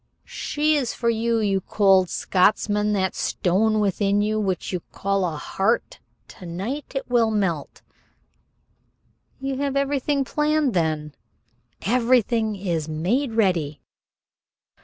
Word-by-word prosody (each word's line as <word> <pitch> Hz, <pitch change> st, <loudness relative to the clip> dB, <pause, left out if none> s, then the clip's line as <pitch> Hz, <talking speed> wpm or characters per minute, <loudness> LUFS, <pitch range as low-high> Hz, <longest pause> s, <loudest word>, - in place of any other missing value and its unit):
"She 305 Hz, +1 st, 0 dB
is 260 Hz, -5 st, -1 dB
for 235 Hz, -1 st, +1 dB
you 230 Hz, +1 st, 0 dB
you 200 Hz, -3 st, +1 dB
cold 190 Hz, -2 st, +3 dB
Scotchman! 210 Hz, +2 st, +1 dB
That 190 Hz, -2 st, 0 dB
stone 215 Hz, +4 st, +1 dB
within 200 Hz, 0 st, +1 dB
you, 215 Hz, +1 st, 0 dB
which 190 Hz, -2 st, -2 dB
you 180 Hz, -, -1 dB
call 195 Hz, -2 st, 0 dB
heart, 195 Hz, +9 st, -1 dB, 0.3 s
to 180 Hz, -, -11 dB
night 210 Hz, -, -5 dB
it 270 Hz, -, -3 dB
will 235 Hz, -2 st, +3 dB
melt." 190 Hz, -9 st, -2 dB, 1.6 s
"You 270 Hz, 0 st, -3 dB
have 280 Hz, -1 st, -1 dB
everything 275 Hz, 0 st, 0 dB
planned 300 Hz, -2 st, +1 dB
then?" 155 Hz, -4 st, -1 dB, 0.7 s
"Everything 230 Hz, -2 st, +2 dB
is 170 Hz, -5 st, -3 dB
made 220 Hz, -, -1 dB
ready." 175 Hz, -9 st, +1 dB
210 Hz, 115 wpm, -23 LUFS, 185-250 Hz, 1.6 s, cold